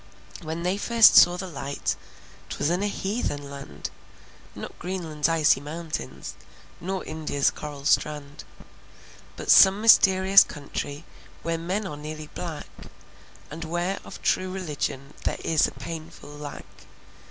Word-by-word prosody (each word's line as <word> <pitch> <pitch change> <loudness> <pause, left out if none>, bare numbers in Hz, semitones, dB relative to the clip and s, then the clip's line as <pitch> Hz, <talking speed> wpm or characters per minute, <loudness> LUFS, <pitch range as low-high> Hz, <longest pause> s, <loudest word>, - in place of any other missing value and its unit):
When 160 +2 -5
they 180 +2 0
first 230 0 +6
saw 175 0 +8
the 190 - -4
light, 140 -5 -3 0.5
'T - - -5
was 150 - 0
in 180 +2 0
a 205 - +1
heathen 190 -9 -3
land. 135 - -7 0.6
Not - - -9
Greenland's 165 -4 -2
icy 160 -4 +4
mountains, 155 - -6 0.5
Nor 190 +2 -4
India's 150 -3 0
coral 145 -2 -8
strand, 150 -1 0 0.9
But - - 0
some 195 +1 +8
mysterious 195 -3 +7
country 145 +1 -6 0.4
Where 165 0 -1
men 185 +5 -2
are 150 -6 -6
nearly 155 0 -8
black 165 -4 -5 0.9
And 165 +2 -6
where 175 +4 -2
of - - -10
true 185 - +1
religion, 145 -6 -4
There - - -1
is 160 -2 +3
a - - -7
painful 160 +2 -8
lack. 145 -1 -8
160 Hz, 135 wpm, -25 LUFS, 145-185 Hz, 0.9 s, saw